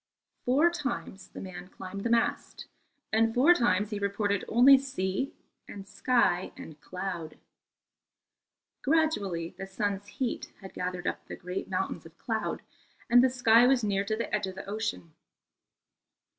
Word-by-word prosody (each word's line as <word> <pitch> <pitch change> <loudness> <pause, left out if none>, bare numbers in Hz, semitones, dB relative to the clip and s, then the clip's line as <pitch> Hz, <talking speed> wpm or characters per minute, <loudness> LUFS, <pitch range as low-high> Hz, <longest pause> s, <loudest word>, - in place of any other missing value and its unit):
Four 290 +7 +4
times 240 - -4
the - - -10
man 180 -1 -8
climbed 195 +1 -7
the 235 - 0
mast, 230 0 0 0.5
and 225 +1 +3
four 285 +8 +7
times 230 - +1
he 210 - -2
reported 200 0 0
only 250 +4 +7
sea 265 -2 -3 0.3
and 195 -1 -9
sky 200 -3 +1
and 155 -2 -11
cloud. 180 -3 -5 1.4
Gradually 210 - +1
the 195 - -5
sun's 200 +1 -2
heat 245 +4 -4
had 190 -2 -11
gathered 180 0 -4
up - - -3
the - - -6
great 180 +1 -5
mountains - - -3
of - - -20
cloud, - - -3 0.5
and 245 +1 +8
the 260 - +5
sky 245 -1 +5
was 260 -1 +4
clear 200 -2 0
to 215 - -1
the 230 - -4
edge 210 -2 0
of 190 - -7
the 190 - -7
ocean. 205 -5 -4
205 Hz, 150 wpm, -29 LUFS, 190-245 Hz, 1.4 s, and